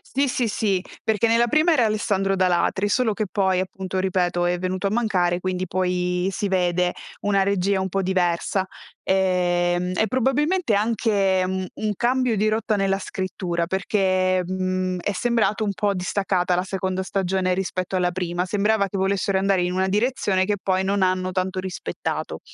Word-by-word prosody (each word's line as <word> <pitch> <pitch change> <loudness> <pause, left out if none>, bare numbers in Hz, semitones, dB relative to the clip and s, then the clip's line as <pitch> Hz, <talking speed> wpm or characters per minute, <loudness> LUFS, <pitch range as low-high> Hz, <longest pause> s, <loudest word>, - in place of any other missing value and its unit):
Sì, 275 0 +2
sì, 245 -1 0
sì, 200 -3 0 0.2
perché 220 +1 +1
nella 230 +1 +3
prima 310 +7 +3
era 260 -6 +3
Alessandro 200 -3 0
D'Alatri, 185 +2 +1
solo 225 +2 +2
che 215 +1 -2
poi 190 -2 +1
appunto 190 0 -3
ripeto 180 -2 0
è 175 0 +1
venuto 185 +2 -2
a - - 0
mancare, 185 -6 +1
quindi 185 0 -2
poi 180 0 0
si 205 - -2
vede 180 -1 +1 0.3
una 200 -1 +2
regia 195 0 +1
un 190 - -2
po' 195 +2 -1
diversa. 185 0 0 0.4
Ehm, 180 -1 +1
e 220 - +2
probabilmente 270 - +1
anche 205 -3 +1
u 190 0 -2
un 215 -1 -2
cambio 250 0 +1
di 210 +2 +2
rotta 215 0 0
nella 195 -1 +1
scrittura, 185 -3 -3
perché, 185 -1 +1
mhmm, 185 0 -1
è 205 - -1
sembrato 215 0 0
un 200 - -1
po' 200 +1 0
distaccata 180 -1 0
la 180 - 0
seconda 190 0 -2
stagione 190 -1 0
rispetto 185 0 -2
alla 180 -1 +1
prima. 175 0 -2
Sembrava 205 +1 +1
che 195 - -5
volessero 195 0 +1
andare 190 -1 +2
in 180 0 -1
una 190 +1 0
direzione 205 -3 +1
che 205 +1 0
poi 190 0 0
non 200 +1 0
hanno 185 0 0
tanto 185 0 -2
rispettato 185 - -4
190 Hz, 170 wpm, -23 LUFS, 185-205 Hz, 0.4 s, nella